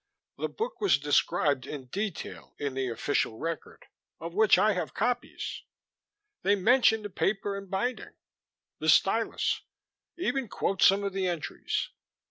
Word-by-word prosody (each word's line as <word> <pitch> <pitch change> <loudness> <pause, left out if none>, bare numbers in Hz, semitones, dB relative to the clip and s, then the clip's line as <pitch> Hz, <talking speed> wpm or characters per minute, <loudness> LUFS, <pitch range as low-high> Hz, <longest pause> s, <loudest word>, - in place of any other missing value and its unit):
"The - - -1
book 465 +2 -4
was 400 - +4
described 145 -1 +1
in 140 -3 -6
detail 195 +7 -5
in 140 -2 -3
the 135 0 -1
official 115 -1 -1
record, 165 +2 -5 0.3
of 165 +1 -6
which 215 0 +5
I 210 +3 +4
have 180 - -4
copies. 245 +3 -2 0.8
They 200 +1 +3
mention 220 +2 +4
the 205 - -5
paper 200 +1 0
and 195 -1 -7
binding, 240 +7 -2 0.6
the - - 0
stylus, - - +3 0.6
even 275 -8 -1
quote 195 -1 -2
some 195 +1 +6
of 200 -1 -2
the 190 -1 0
entries. 170 -4 -2
195 Hz, 140 wpm, -29 LUFS, 155-220 Hz, 0.8 s, some